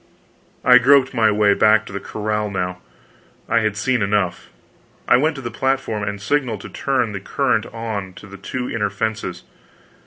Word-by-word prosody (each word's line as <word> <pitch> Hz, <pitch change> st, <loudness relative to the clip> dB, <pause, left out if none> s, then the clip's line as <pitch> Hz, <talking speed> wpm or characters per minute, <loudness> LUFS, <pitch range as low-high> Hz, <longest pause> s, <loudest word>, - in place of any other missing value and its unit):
I 125 Hz, 0 st, +8 dB
groped 135 Hz, +1 st, +4 dB
my 115 Hz, -3 st, +3 dB
way 105 Hz, -1 st, +3 dB
back 110 Hz, +1 st, +4 dB
to -, -, -10 dB
the 100 Hz, -, -3 dB
corral 105 Hz, 0 st, -3 dB
now; 90 Hz, -2 st, -3 dB, 0.7 s
I 115 Hz, -, +3 dB
had 110 Hz, -2 st, -1 dB
seen 125 Hz, +3 st, 0 dB
enough. 100 Hz, -7 st, -1 dB, 0.6 s
I -, -, +6 dB
went 155 Hz, +4 st, +1 dB
to 135 Hz, -, -8 dB
the 120 Hz, -, -4 dB
platform 130 Hz, -3 st, -1 dB
and 100 Hz, 0 st, -3 dB
signaled 120 Hz, -2 st, -1 dB
to -, -, -9 dB
turn 130 Hz, -5 st, -1 dB
the 100 Hz, -, -5 dB
current 115 Hz, +2 st, 0 dB
on 110 Hz, -5 st, -5 dB
to -, -, -13 dB
the 100 Hz, 0 st, -11 dB
two 125 Hz, +5 st, -5 dB
inner 105 Hz, -3 st, -1 dB
fences. 105 Hz, -3 st, -4 dB
110 Hz, 180 wpm, -20 LUFS, 100-125 Hz, 0.7 s, I